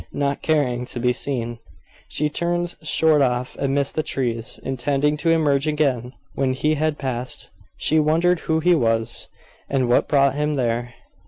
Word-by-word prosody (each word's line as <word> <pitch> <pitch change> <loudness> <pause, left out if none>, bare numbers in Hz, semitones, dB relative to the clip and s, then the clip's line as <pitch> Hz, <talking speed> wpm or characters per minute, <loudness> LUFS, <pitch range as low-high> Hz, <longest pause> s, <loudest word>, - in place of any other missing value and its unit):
Not 140 -1 -1
caring 125 -6 0
to 120 - -5
be 125 +1 +2
seen, 120 -4 -3 0.5
she 150 - 0
turned 175 +3 -2
short 155 -1 +3
off 125 -1 0
amidst 140 0 0
the 155 - 0
trees, 120 -6 -3
intending 140 +3 0
to 165 +3 0
emerge 150 -3 +2
again 135 -5 0 0.2
when 130 -1 0
he 150 +4 +1
had 155 0 0
passed. 125 -2 -3 0.3
She 155 - +2
wondered 165 +3 +3
who 160 0 0
he 175 +2 +4
was, 115 -5 0 0.4
and 130 -2 +1
what 120 - +3
brought 140 -2 +3
him 150 +1 -1
there. 120 -2 -1
140 Hz, 160 wpm, -22 LUFS, 125-155 Hz, 0.5 s, he